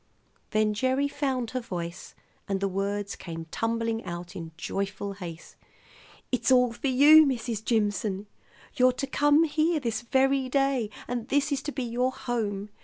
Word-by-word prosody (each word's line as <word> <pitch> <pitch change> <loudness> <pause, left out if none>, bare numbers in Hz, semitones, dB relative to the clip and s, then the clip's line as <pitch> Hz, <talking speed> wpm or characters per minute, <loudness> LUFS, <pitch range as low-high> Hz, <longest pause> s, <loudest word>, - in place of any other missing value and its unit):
Then 215 -1 +2
Gerry 260 +5 +1
found 265 -5 -2
her 255 - -1
voice, 175 -7 -6 0.3
and 195 -1 -1
the 195 - 0
words 200 +1 -2
came 165 -2 -7
tumbling 230 0 -1
out 175 0 -7
in 165 -2 -7
joyful 200 +3 -3
haste. 170 -5 -9 0.7
"It's 250 +1 +1
all 250 -2 +5
for 255 - -3
you, 290 +4 +8
Mrs. 235 -4 -2
Jimson. 205 -3 0 0.5
You're 255 -2 +4
to 265 - -3
come 290 +3 +4
here 315 +1 +1
this 230 -5 -2
very 265 +2 +2
day, 270 -4 +1 0.2
and 240 -1 -3
this 285 +2 +1
is 280 -1 0
to 295 - -4
be 265 - -3
your 245 +2 0
home. 215 -6 -3
235 Hz, 160 wpm, -27 LUFS, 200-270 Hz, 0.7 s, you